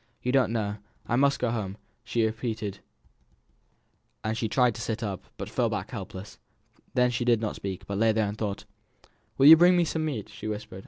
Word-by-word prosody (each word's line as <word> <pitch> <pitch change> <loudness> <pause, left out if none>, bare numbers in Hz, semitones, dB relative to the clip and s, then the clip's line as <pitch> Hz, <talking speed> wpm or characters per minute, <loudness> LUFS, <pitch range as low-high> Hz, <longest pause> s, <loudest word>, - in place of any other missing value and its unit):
"You 125 - 0
don't 130 -4 +3
know. 105 -2 -2 0.3
I 120 - 0
must 140 +2 +3
go 125 -2 0
home," 105 -4 -3 0.3
she 115 -1 0
repeated; 110 -3 -3 1.4
and 110 +1 -1
she 110 -1 -2
tried 125 0 +3
to 115 - -7
sit 115 0 -3
up, 100 -3 -4
but - - -5
fell - - 0
back - - -4
helpless. 95 +3 -8 0.6
Then 125 -1 +3
she 120 0 -1
did 120 -2 +3
not 110 -2 -3
speak, 95 0 -5
but 100 0 -3
lay 115 0 +4
and 105 -2 0
thought. 105 -2 -4 0.7
"Will 135 - +4
you 155 +3 +12
bring 175 +2 +5
me 175 - +3
some 160 0 -2
meat?" 135 -10 -3
she - - -8
whispered. 105 -3 -5
115 Hz, 200 wpm, -27 LUFS, 105-125 Hz, 1.4 s, you